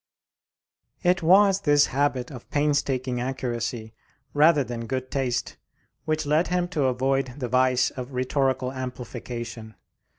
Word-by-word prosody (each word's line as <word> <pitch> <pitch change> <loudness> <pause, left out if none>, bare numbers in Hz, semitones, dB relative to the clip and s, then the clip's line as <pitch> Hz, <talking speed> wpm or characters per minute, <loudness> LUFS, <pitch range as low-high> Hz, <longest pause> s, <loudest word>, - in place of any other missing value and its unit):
It 175 0 +3
was 195 +3 +5
this 145 -4 +4
habit 135 -2 -1
of 125 -4 -11
painstaking 135 -4 0
accuracy, 120 -3 -3 0.4
rather 150 0 +5
than 115 -2 -6
good 130 0 -3
taste, 130 -3 -2 0.5
which 155 0 -1
led 155 +4 +2
him 180 0 0
to 155 -6 0
avoid 130 0 0
the 130 -4 -3
vice 130 +1 +2
of 125 0 -7
rhetorical 130 0 0
amplification. 120 -3 -7
130 Hz, 125 wpm, -25 LUFS, 125-145 Hz, 0.5 s, was